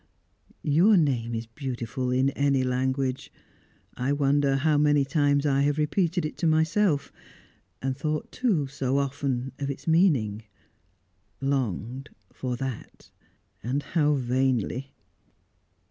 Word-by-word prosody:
"Your 175 Hz, +8 st, +5 dB
name 120 Hz, -7 st, +1 dB
is 115 Hz, 0 st, -4 dB
beautiful 125 Hz, 0 st, -4 dB
in 130 Hz, +2 st, +2 dB
any 140 Hz, -1 st, +1 dB
language. 130 Hz, +1 st, -1 dB, 0.6 s
I 125 Hz, +3 st, -1 dB
wonder 140 Hz, -1 st, +2 dB
how 150 Hz, +3 st, +2 dB
many 145 Hz, -1 st, +3 dB
times 145 Hz, -1 st, +2 dB
I 140 Hz, -1 st, +2 dB
have 145 Hz, +1 st, +1 dB
repeated 170 Hz, +2 st, 0 dB
it 155 Hz, -, -5 dB
to 170 Hz, -, 0 dB
myself? 160 Hz, 0 st, +2 dB, 0.7 s
And 135 Hz, 0 st, -1 dB
thought, 150 Hz, +2 st, -3 dB
too, 205 Hz, -, +1 dB
so 135 Hz, -1 st, -1 dB
often 135 Hz, -2 st, -2 dB
of 140 Hz, -1 st, -2 dB
its 140 Hz, 0 st, -6 dB
meaning; 150 Hz, -, +2 dB, 1.0 s
longed, 130 Hz, -2 st, -2 dB, 0.2 s
for 125 Hz, -2 st, -3 dB
that 130 Hz, -2 st, -7 dB, 0.5 s
and 135 Hz, +5 st, -2 dB
how 150 Hz, -3 st, +1 dB
vainly!" 130 Hz, 0 st, 0 dB
140 Hz, 120 wpm, -26 LUFS, 130-150 Hz, 1.0 s, Your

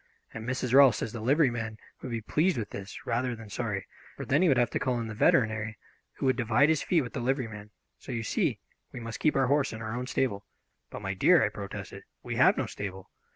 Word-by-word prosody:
And 110 Hz, +2 st, -5 dB
Mrs. 130 Hz, -1 st, -2 dB
Rolfs 135 Hz, -3 st, +7 dB
says 110 Hz, -, -4 dB
the 115 Hz, -, -5 dB
liveryman 120 Hz, -4 st, +1 dB, 0.2 s
would 130 Hz, -, -6 dB
be 115 Hz, -1 st, -3 dB
pleased 160 Hz, -, +1 dB
with 105 Hz, -3 st, -4 dB
this, 100 Hz, 0 st, -8 dB
rather 125 Hz, +1 st, -1 dB
than 115 Hz, -2 st, -11 dB
sorry, 105 Hz, -4 st, -3 dB, 0.3 s
for -, -, -5 dB
then 145 Hz, +5 st, +2 dB
he 185 Hz, -, +4 dB
would 135 Hz, -5 st, +4 dB
have 120 Hz, -1 st, +2 dB
to -, -, -1 dB
call 125 Hz, -3 st, 0 dB
in 115 Hz, -, -3 dB
the 110 Hz, -, -6 dB
veterinary, 110 Hz, -1 st, +2 dB, 0.4 s
who -, -, -4 dB
would 130 Hz, -1 st, +3 dB
divide 120 Hz, +4 st, +3 dB
his 160 Hz, -2 st, +2 dB
fee 170 Hz, -3 st, +2 dB
with 125 Hz, -, -8 dB
the -, -, -3 dB
liveryman. 115 Hz, -5 st, -2 dB, 0.3 s
So, -, -, -9 dB
you 115 Hz, -2 st, -2 dB
see, -, -, 0 dB, 0.3 s
we -, -, -7 dB
must 115 Hz, -1 st, -6 dB
keep 155 Hz, -, +2 dB
our 135 Hz, -1 st, +3 dB
horse 140 Hz, 0 st, +1 dB
in 110 Hz, -, -6 dB
our 110 Hz, +1 st, -4 dB
own 125 Hz, +1 st, -4 dB
stable." 100 Hz, -7 st, -1 dB, 0.4 s
"But, -, -, -8 dB
my 95 Hz, 0 st, -2 dB
dear," 95 Hz, -, +5 dB
I -, -, 0 dB
protested, -, -, -7 dB, 0.2 s
"we -, -, -4 dB
have -, -, +5 dB
no -, -, 0 dB
stable." 95 Hz, -2 st, -7 dB
120 Hz, 240 wpm, -29 LUFS, 110-130 Hz, 0.4 s, Rolfs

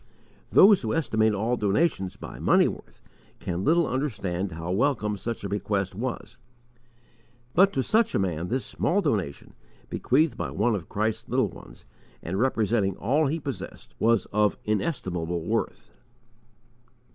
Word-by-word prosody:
Those 200 Hz, -1 st, +7 dB
who 110 Hz, +2 st, -1 dB
estimate 110 Hz, -8 st, +2 dB
all 115 Hz, +5 st, 0 dB
donations 100 Hz, -, 0 dB
by -, -, -9 dB
money -, -, +4 dB
worth -, -, -9 dB, 0.4 s
can 90 Hz, +1 st, -3 dB
little 170 Hz, +5 st, +3 dB
understand 100 Hz, -, -2 dB
how 85 Hz, +2 st, -5 dB
welcome 110 Hz, -1 st, +1 dB
such 115 Hz, +2 st, -5 dB
a 100 Hz, -, -3 dB
bequest 100 Hz, -1 st, -1 dB
was; 120 Hz, +5 st, -5 dB, 1.1 s
but 195 Hz, +3 st, +5 dB
to 135 Hz, -, 0 dB
such 225 Hz, -, +2 dB
a -, -, +4 dB
man 90 Hz, -3 st, -1 dB
this 130 Hz, +5 st, -2 dB
small 200 Hz, +4 st, 0 dB
donation, 90 Hz, -, -2 dB, 0.4 s
bequeathed 135 Hz, -1 st, +1 dB
by -, -, -3 dB
one 115 Hz, +4 st, +1 dB
of 95 Hz, -6 st, -4 dB
Christ's 110 Hz, +1 st, -2 dB
little -, -, +1 dB
ones, -, -, -14 dB, 0.4 s
and 95 Hz, +4 st, -3 dB
representing 110 Hz, -5 st, +1 dB
all 145 Hz, +8 st, +1 dB
he 160 Hz, +4 st, -1 dB
possessed, 140 Hz, -3 st, -7 dB
was 115 Hz, -4 st, +3 dB
of 105 Hz, -1 st, +2 dB
inestimable 90 Hz, -, -2 dB
worth. -, -, -3 dB
110 Hz, 145 wpm, -26 LUFS, 95-135 Hz, 1.1 s, Those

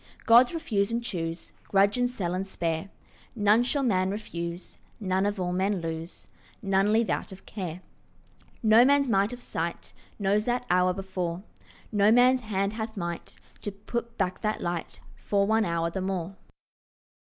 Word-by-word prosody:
Gods 240 Hz, +2 st, +7 dB
refuse 230 Hz, -12 st, -1 dB
and 235 Hz, +1 st, -1 dB
choose, 170 Hz, -7 st, -4 dB
Grudge 200 Hz, +1 st, +3 dB
and 245 Hz, 0 st, +1 dB
sell 185 Hz, -8 st, -3 dB
and 190 Hz, +2 st, -2 dB
spare; 165 Hz, 0 st, -2 dB, 0.5 s
None 210 Hz, +1 st, +4 dB
shall 275 Hz, +3 st, 0 dB
man 190 Hz, -6 st, +2 dB
refuse, 175 Hz, -4 st, -5 dB, 0.2 s
None 190 Hz, -1 st, +1 dB
of 205 Hz, -1 st, -2 dB
all 180 Hz, -1 st, -1 dB
men 190 Hz, +1 st, +1 dB
lose, 165 Hz, +1 st, -6 dB, 0.4 s
None 195 Hz, +1 st, +2 dB
leave 225 Hz, +1 st, +2 dB
out -, -, -2 dB
of 190 Hz, 0 st, -12 dB
care. 180 Hz, -4 st, -6 dB, 0.8 s
No 220 Hz, +2 st, +7 dB
man's 280 Hz, +1 st, +4 dB
might 200 Hz, -1 st, +2 dB
of 245 Hz, 0 st, -8 dB
sight 170 Hz, +1 st, -4 dB, 0.2 s
Knows 205 Hz, +1 st, +1 dB
that 245 Hz, 0 st, 0 dB
hour 180 Hz, 0 st, +4 dB
before; 185 Hz, -2 st, -4 dB, 0.5 s
No 205 Hz, 0 st, +4 dB
man's 250 Hz, +2 st, +5 dB
hand 200 Hz, -2 st, -1 dB
hath 220 Hz, 0 st, -5 dB
might 170 Hz, -2 st, -5 dB, 0.2 s
To 205 Hz, -, -4 dB
put 235 Hz, +4 st, -5 dB
back 185 Hz, -2 st, -1 dB
that 215 Hz, -1 st, -1 dB
light 175 Hz, -1 st, -4 dB, 0.2 s
For 200 Hz, -1 st, +1 dB
one 220 Hz, +1 st, +2 dB
hour 170 Hz, -1 st, -1 dB
the 190 Hz, -, -3 dB
more. 190 Hz, -1 st, -3 dB
200 Hz, 165 wpm, -27 LUFS, 180-225 Hz, 0.8 s, Gods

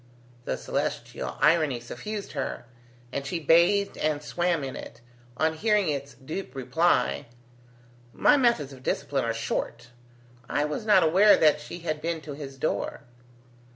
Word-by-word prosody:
The 65 Hz, -, -2 dB
celestial -, -, -3 dB
irony 155 Hz, -6 st, +3 dB
suffused 205 Hz, -, -6 dB
her, 135 Hz, -4 st, -4 dB, 0.5 s
and 140 Hz, -, -2 dB
she 165 Hz, +5 st, -3 dB
bathed 170 Hz, +6 st, +3 dB
and 150 Hz, -1 st, 0 dB
swam 175 Hz, -1 st, 0 dB
in 135 Hz, -1 st, -5 dB
it, -, -, -9 dB, 0.4 s
on 160 Hz, 0 st, +2 dB
hearing 210 Hz, +1 st, +2 dB
its 140 Hz, -2 st, -4 dB
dupe 135 Hz, +3 st, -7 dB
reply: 160 Hz, +1 st, +1 dB, 0.8 s
"My 295 Hz, -, +4 dB
methods 235 Hz, -, +2 dB
of 130 Hz, -, -13 dB
discipline 135 Hz, 0 st, -1 dB
are 115 Hz, -, 0 dB
short. 115 Hz, +1 st, -3 dB, 0.6 s
I 145 Hz, -, +1 dB
was 150 Hz, +9 st, -4 dB
not 200 Hz, -4 st, +6 dB
aware 190 Hz, +6 st, +6 dB
that 150 Hz, -1 st, +4 dB
she 175 Hz, +3 st, -8 dB
had 155 Hz, -2 st, -3 dB
been 165 Hz, 0 st, -2 dB
to 150 Hz, -2 st, -7 dB
his 140 Hz, -2 st, -8 dB
door." 145 Hz, -, -2 dB
155 Hz, 150 wpm, -27 LUFS, 140-175 Hz, 0.8 s, not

